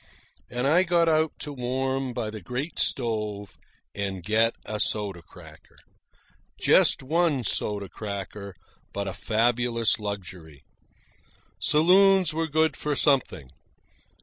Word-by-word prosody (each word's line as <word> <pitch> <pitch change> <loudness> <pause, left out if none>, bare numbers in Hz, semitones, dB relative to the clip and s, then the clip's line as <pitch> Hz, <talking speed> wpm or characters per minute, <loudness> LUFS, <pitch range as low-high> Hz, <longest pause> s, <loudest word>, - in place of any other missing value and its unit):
And 125 +1 -2
I 160 +6 +4
got 170 -2 +2
out 155 -1 +2
to 145 - -3
warm 130 +1 -2
by 120 -3 -4
the 110 -1 -8
great 125 - -5
stove 105 -5 -2 0.4
and 95 -3 -4
get 110 +4 +2
a 105 0 -4
soda 100 -5 -1
cracker. - - -16 0.8
Just - - +4
one 155 -2 +1
soda 100 -1 -2
cracker, 100 -1 -7 0.4
but 100 0 -3
a 95 - -3
fabulous 115 0 +1
luxury. 90 -8 -7 1.0
Saloons 180 - +4
were 165 +1 -1
good 160 +1 +1
for 150 -1 -2
something. 125 - +1
120 Hz, 120 wpm, -26 LUFS, 100-150 Hz, 1.0 s, I